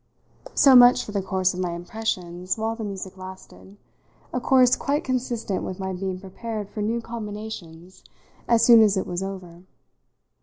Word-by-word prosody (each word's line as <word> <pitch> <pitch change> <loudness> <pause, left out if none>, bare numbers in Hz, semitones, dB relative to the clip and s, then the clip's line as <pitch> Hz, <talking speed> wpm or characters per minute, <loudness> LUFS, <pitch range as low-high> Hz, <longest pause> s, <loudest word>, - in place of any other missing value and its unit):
So 270 -2 +7
much 245 0 +7
for - - -8
the 200 -1 -1
course 190 -1 0
of 180 - -6
my 180 -2 -2
impressions 180 -1 -4
while 225 +1 -2
the 225 - -6
music 195 -2 -6
lasted 190 +1 -12 0.6
a 250 - -1
course 255 -1 +4
quite 290 +3 -1
consistent 240 -6 -2
with 185 - -5
my 190 0 -3
being 185 0 -4
prepared 205 +2 -6
for 210 - -5
new 230 +3 -1
combinations 210 -6 -8 0.4
as 230 -1 +3
soon 235 -2 +8
as 210 -2 +4
it 190 - -1
was 175 +1 -4
over. 185 -3 -7
200 Hz, 165 wpm, -24 LUFS, 185-230 Hz, 0.6 s, soon